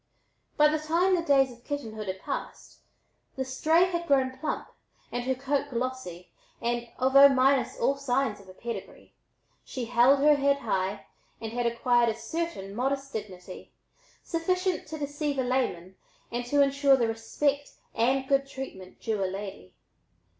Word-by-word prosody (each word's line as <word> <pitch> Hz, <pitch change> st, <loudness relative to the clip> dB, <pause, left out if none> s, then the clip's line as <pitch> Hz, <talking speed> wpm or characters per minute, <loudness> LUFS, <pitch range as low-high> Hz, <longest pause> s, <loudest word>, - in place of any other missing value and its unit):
By 300 Hz, -, +7 dB
the 305 Hz, +1 st, +1 dB
time 335 Hz, +5 st, +2 dB
the 345 Hz, -, 0 dB
days 275 Hz, -4 st, +3 dB
of 240 Hz, 0 st, -16 dB
kittenhood 220 Hz, -8 st, -5 dB
had 190 Hz, 0 st, -4 dB
passed -, -, -6 dB, 0.6 s
the 265 Hz, -, -2 dB
"stray" 315 Hz, +6 st, +3 dB
had 340 Hz, -2 st, -3 dB
grown 265 Hz, -2 st, +2 dB
plump 285 Hz, +4 st, -3 dB, 0.4 s
and 245 Hz, 0 st, -3 dB
her 260 Hz, 0 st, +1 dB
coat 275 Hz, +2 st, -1 dB
glossy, 245 Hz, -8 st, -4 dB, 0.3 s
and 240 Hz, 0 st, -2 dB
although 275 Hz, +2 st, +7 dB
minus 270 Hz, 0 st, +2 dB
all 270 Hz, +4 st, +2 dB
signs 260 Hz, -5 st, 0 dB
of 200 Hz, -, -16 dB
pedigree, 235 Hz, 0 st, -7 dB, 0.5 s
she 255 Hz, -3 st, -5 dB
held 245 Hz, +4 st, +5 dB
her 295 Hz, +1 st, +5 dB
head 280 Hz, 0 st, +3 dB
high 195 Hz, -, -2 dB, 0.3 s
and 225 Hz, 0 st, -6 dB
had 240 Hz, 0 st, 0 dB
acquired 235 Hz, 0 st, +2 dB
a 220 Hz, -, -1 dB
certain 320 Hz, -, -4 dB
modest 275 Hz, +4 st, -2 dB
dignity, 190 Hz, -4 st, -8 dB, 0.5 s
sufficient 365 Hz, +2 st, -1 dB
to 315 Hz, +1 st, -6 dB
deceive 290 Hz, 0 st, -3 dB
a 260 Hz, -, +1 dB
layman 245 Hz, -8 st, -1 dB, 0.4 s
and 240 Hz, +1 st, -3 dB
to 285 Hz, +2 st, +4 dB
insure 275 Hz, 0 st, +4 dB
the 235 Hz, -3 st, +1 dB
respect 280 Hz, +6 st, -1 dB, 0.2 s
and 260 Hz, +3 st, +1 dB
good 275 Hz, 0 st, +2 dB
treatment 265 Hz, -9 st, -9 dB
due 215 Hz, -3 st, -1 dB
a -, -, +1 dB
lady. 190 Hz, -, -8 dB
260 Hz, 155 wpm, -28 LUFS, 230-280 Hz, 0.6 s, By